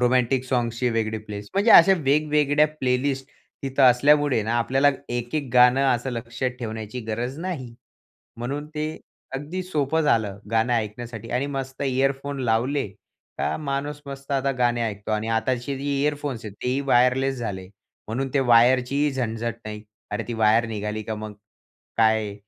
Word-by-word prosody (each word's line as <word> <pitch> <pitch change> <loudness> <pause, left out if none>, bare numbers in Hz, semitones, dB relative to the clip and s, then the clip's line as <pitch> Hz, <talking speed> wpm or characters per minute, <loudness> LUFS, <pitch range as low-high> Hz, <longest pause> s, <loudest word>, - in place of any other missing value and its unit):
Romantic 125 +1 +2
सॉंग्सचे 120 -1 0
वेगळे 110 -1 -1
place. 105 -1 -8
म्हणजे 205 +4 +3
अशा 180 +3 +9
वेगवेगळ्या 150 0 +3
प्लेलिस्ट 130 +1 0 0.4
तिथं 135 0 0
असल्यामुळे 140 0 +4
ना, 110 +3 -1
आपल्याला 135 +4 +3 0.2
एक, 120 +2 -4
एक 145 -3 -2
गाणं 125 +2 +6
असं 120 +2 -3
लक्षात 120 +1 -3
ठेवण्याची 110 +1 -5
गरज 120 +6 -3
नाही. 140 -11 -5 0.6
म्हणून 140 +5 -4
ते 150 0 -1 0.5
अगदी 155 +7 -4
सोपं 160 -3 0
झालं 110 -8 +1
गाणं 115 +2 +2
ऐकण्यासाठी 115 +1 -4
आणि 130 +3 0
मस्त 135 -1 -5
इअरफोन 135 +1 0
लावले. 125 +3 +1 0.5
का - - 0
माणूस 145 0 -3
मस्त 140 0 -9
आता 135 0 +1
गाणे 120 -1 +2
ऐकतो 105 -2 -4
आणि 110 +1 -1
आताची 125 +4 -1
जी 140 0 -1
इअरफोन्स 145 -5 -2
आहेत, 105 -2 -7
तेही 130 +2 0
वायरलेस 125 +2 +3
झाले. 95 -6 -4 0.4
म्हणून 135 +5 -2
ते 140 - +4
वायरचीही 125 +4 +4
झणझट 115 -3 -2
नाही. 105 -1 -6 0.3
अरे, - - -1
ती 120 - -3
वायर 110 +2 +4
निघाली 105 0 -3
का 110 - -4
मग? 105 -1 -7 0.6
काय 110 -2 +2
125 Hz, 150 wpm, -24 LUFS, 115-140 Hz, 0.6 s, अशा